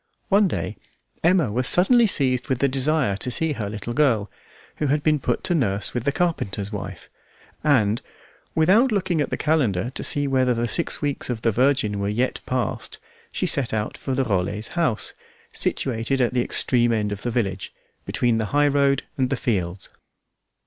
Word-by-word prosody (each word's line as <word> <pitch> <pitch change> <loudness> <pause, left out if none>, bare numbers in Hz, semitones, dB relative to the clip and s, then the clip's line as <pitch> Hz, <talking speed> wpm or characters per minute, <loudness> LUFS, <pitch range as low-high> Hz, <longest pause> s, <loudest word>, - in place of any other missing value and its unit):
One 200 0 +4
day 85 - -4 0.5
Emma 175 -1 +4
was 125 +2 0
suddenly 230 +6 +5
seized 130 -8 +2
with 130 - +1
the 140 - +2
desire 135 -3 +1
to 125 - -3
see 155 +5 +2
her 105 -6 -4
little 105 +3 -5
girl, 120 -8 +1 0.5
who 150 - -1
had 145 +2 0
been 155 -1 +2
put 125 -2 -2
to 180 - +2
nurse 105 - 0
with 120 -2 -3
the 140 - +2
carpenter's 105 - -2
wife, 105 - -7 0.6
and, 120 -7 +2 0.5
without 200 +11 +4
looking 185 -6 0
at 145 - -1
the - - -2
calendar 125 - 0
to - - -6
see 145 0 +3
whether 130 -2 +2
the 120 +1 -1
six 165 +4 0
weeks 145 -3 -2
of 115 -3 -4
the 115 - +3
Virgin 120 -4 +1
were 100 0 -1
yet 120 +5 -1
passed, 125 -4 -3 0.3
she - - -2
set 125 -5 +2
out 105 0 -3
for 135 - -4
the 135 - +1
Rollets' 100 0 -1
house, 160 -11 -1 0.4
situated 125 +2 -1
at 125 -1 +1
the 125 - +2
extreme 120 -2 +1
end 105 -2 0
of 100 -1 -5
the 120 - -2
village, 100 -5 -2 0.3
between 120 -2 0
the 110 - -1
highroad 140 +2 +2 0.2
and 130 -1 +1
the 135 - -1
fields. 95 -6 -2
125 Hz, 185 wpm, -23 LUFS, 110-145 Hz, 0.6 s, suddenly